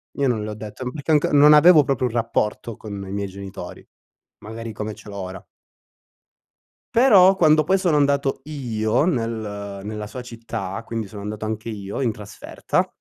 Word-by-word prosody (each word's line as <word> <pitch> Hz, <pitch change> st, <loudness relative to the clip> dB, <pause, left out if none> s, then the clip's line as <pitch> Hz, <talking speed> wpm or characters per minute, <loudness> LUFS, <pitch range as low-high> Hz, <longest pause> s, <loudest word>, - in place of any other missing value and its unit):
Io 140 Hz, -, +1 dB
non 115 Hz, -4 st, 0 dB
l'ho 105 Hz, 0 st, -4 dB
detto, 110 Hz, +4 st, -6 dB
perché 145 Hz, +1 st, -3 dB
anco 150 Hz, -1 st, +3 dB
non 145 Hz, +1 st, +7 dB
avevo 150 Hz, +1 st, +7 dB
proprio 135 Hz, -2 st, 0 dB
un 115 Hz, -, -7 dB
rapporto 115 Hz, -1 st, -1 dB
con 105 Hz, -2 st, -8 dB
i -, -, -7 dB
miei 100 Hz, 0 st, -2 dB
genitori, 95 Hz, -2 st, -9 dB, 0.5 s
magari 115 Hz, +1 st, -7 dB
come 105 Hz, 0 st, -5 dB
ce 105 Hz, -, -13 dB
l'ho 100 Hz, -, -8 dB
ora. 95 Hz, -1 st, -7 dB, 1.5 s
Però 195 Hz, -6 st, +6 dB
quando 155 Hz, -3 st, +4 dB
poi 190 Hz, +5 st, +2 dB
sono 175 Hz, -5 st, +2 dB
andato 140 Hz, -1 st, +1 dB
io 120 Hz, -5 st, -1 dB
nel 110 Hz, -, -3 dB
nella 105 Hz, +1 st, -5 dB
sua 120 Hz, +5 st, -7 dB
città, 115 Hz, -4 st, -6 dB
quindi 115 Hz, -2 st, -4 dB
sono 100 Hz, 0 st, -9 dB
andato 105 Hz, +1 st, -5 dB
anche 110 Hz, +1 st, -4 dB
io 100 Hz, +3 st, -5 dB
in 120 Hz, -4 st, +1 dB
trasferta 105 Hz, -1 st, -3 dB
115 Hz, 170 wpm, -22 LUFS, 105-140 Hz, 1.5 s, non